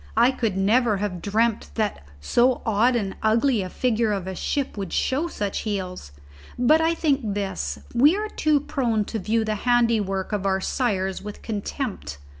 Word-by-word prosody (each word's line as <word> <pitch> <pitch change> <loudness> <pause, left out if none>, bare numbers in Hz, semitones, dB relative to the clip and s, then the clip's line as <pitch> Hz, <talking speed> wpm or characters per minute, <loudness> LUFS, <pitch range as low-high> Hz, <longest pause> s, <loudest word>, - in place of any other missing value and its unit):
I 235 +2 +6 0.3
never 215 +4 +3
could 195 - -5
have 185 -4 -3
dreamt 220 +2 0
that 215 - -1 0.2
so 240 - +2
odd 230 +3 +3
and 200 -5 -2
ugly 230 +2 +2
a 185 - -4
figure 230 -2 0
of 195 -3 -3
a 190 - -4
ship 275 - -2
would 195 -3 -5
show 290 +6 0
such 205 -11 -3
heels. 185 - -4 0.5
But 300 +6 +4
I 330 +1 +2
think 275 -11 0
this: 135 - -3 0.2
we 290 +8 +5
are 425 +1 -3
too 305 -6 +2
prone 235 -7 0
to 220 - -4
view 220 +3 0
the 215 - 0
handiwork 230 -6 +1
of 200 -2 -1
our 190 0 +1
sires 195 -4 -1
with 205 0 -9
contempt. 205 - -4
220 Hz, 175 wpm, -24 LUFS, 195-250 Hz, 0.5 s, I